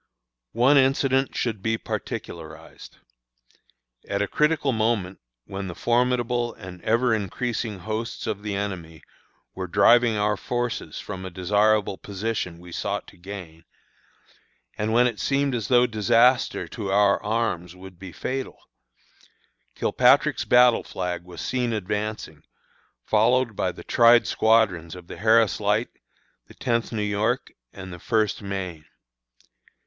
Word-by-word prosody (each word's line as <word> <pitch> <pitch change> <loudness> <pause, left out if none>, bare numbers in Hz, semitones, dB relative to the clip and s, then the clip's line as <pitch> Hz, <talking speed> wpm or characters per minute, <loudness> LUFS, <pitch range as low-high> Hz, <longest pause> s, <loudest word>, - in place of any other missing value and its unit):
One 125 +5 +4
incident 135 0 +2
should 110 -5 -2
be 115 +2 0
particularized. 80 -6 -7 1.1
At 100 +1 0
a - - -2
critical 150 0 +1
moment, 110 -5 -1 0.3
when 95 0 -6
the 90 - -7
formidable 120 0 0
and 90 -3 -10
ever 115 +2 +2
increasing 110 +1 -3
hosts 110 +5 -4
of 100 - -3
the 105 -1 -4
enemy 90 -5 -5 0.5
were 95 -1 -5
driving 115 +4 +4
our 105 0 +1
forces 120 +1 -3
from 95 - -7
a 95 - -5
desirable 105 +2 +1
position 100 -3 -4
we 90 +1 -13
sought - - -3
to - - -18
gain, 85 -3 -10 1.1
and 105 +1 -2
when 120 +2 +4
it 115 -4 -1
seemed 140 0 0
as 115 -4 -2
though 125 -1 +5
disaster 120 +3 +2
to 100 -5 -5
our 100 0 +3
arms 105 -6 -2
would 90 -1 -13
be 95 -1 -9
fatal, 130 +9 -4 1.2
Kilpatrick's - - +3
battle 125 -1 +5
flag 90 -2 -4
was 85 -3 -9
seen 125 -2 -1
advancing, 105 -6 -4 0.6
followed 115 +1 +2
by 95 - -1
the 85 - -12
tried 120 0 +5
squadrons 100 -7 +2
of 90 -1 -11
the - - -9
Harris 110 0 +3
Light, 105 +3 +1 0.6
the - - -16
Tenth 115 -1 -1
New 110 -2 -2
York, 105 +5 -1 0.2
and 95 -1 -9
the 90 - -9
First 110 0 0
Maine. 95 -6 -5
105 Hz, 135 wpm, -24 LUFS, 95-120 Hz, 1.2 s, though